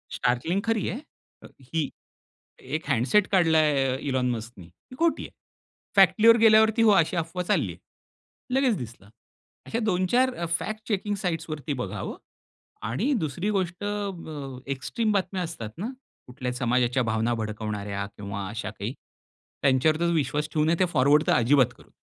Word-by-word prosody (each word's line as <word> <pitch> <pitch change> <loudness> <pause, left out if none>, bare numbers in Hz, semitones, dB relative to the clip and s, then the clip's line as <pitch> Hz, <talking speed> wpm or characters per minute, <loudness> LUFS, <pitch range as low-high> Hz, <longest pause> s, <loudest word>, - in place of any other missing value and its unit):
STARLINKखरी 180 - 0
आहे 235 - -4 0.4
अ, - - -10
ही. 145 +3 -2 0.9
एक 160 +3 -3
हँडसेट 135 - +3
काढला 165 -4 +4
आहे, 135 -4 +2
इलोन 130 -2 +1
मस्कने 115 -5 -6
ही 90 - -17
खोटी 335 0 +2
आहे. - - -9 0.7
फॅक्टलीवर 230 +1 +7
गेल्यावरती 220 +1 +6
हो 225 - +6
अशी 170 +2 -1
अफवा 170 +2 -2
चालली 175 - 0
आहे, - - -15 0.8
लगेच 260 -5 +2
दिसलं. 115 -4 -9 0.6
अशा 225 - -2
2-4 240 +8 +2
अ, 170 - -3
फॅक्ट 215 0 -5
चेकिंग 205 -1 -1
साइट्सवरती 160 -3 -3
बघावं - - -5 0.7
आणि 220 - 0
दुसरी 170 +8 -2
गोष्ट 185 -1 -2
अ, 205 -1 -2
ब, 145 -6 -8 0.2
एक्स्ट्रीम 215 - -1
बातम्या 190 -2 -1
असतात 160 -11 -6
ना 210 +6 -3 0.4
कुठल्याही 125 0 -5
समाजाच्या 125 0 +1
भावना 110 +1 0
भडकवणाऱ्या 105 -2 -4
किंवा 100 -1 -5
अशा 110 +1 -5
काही, 105 +2 -5 0.7
त्यांच्यावर 140 +4 +3
तर 170 0 +2
विश्वास 150 -1 0
ठेवू 155 -1 +2
नये 160 +2 +3
ते 185 - +5
फॉरवर्ड 145 +2 +4
तर - - +3
अजिबात 130 +1 +4
करू - - -18
नये. - - -31
155 Hz, 150 wpm, -26 LUFS, 125-195 Hz, 0.9 s, फॅक्टलीवर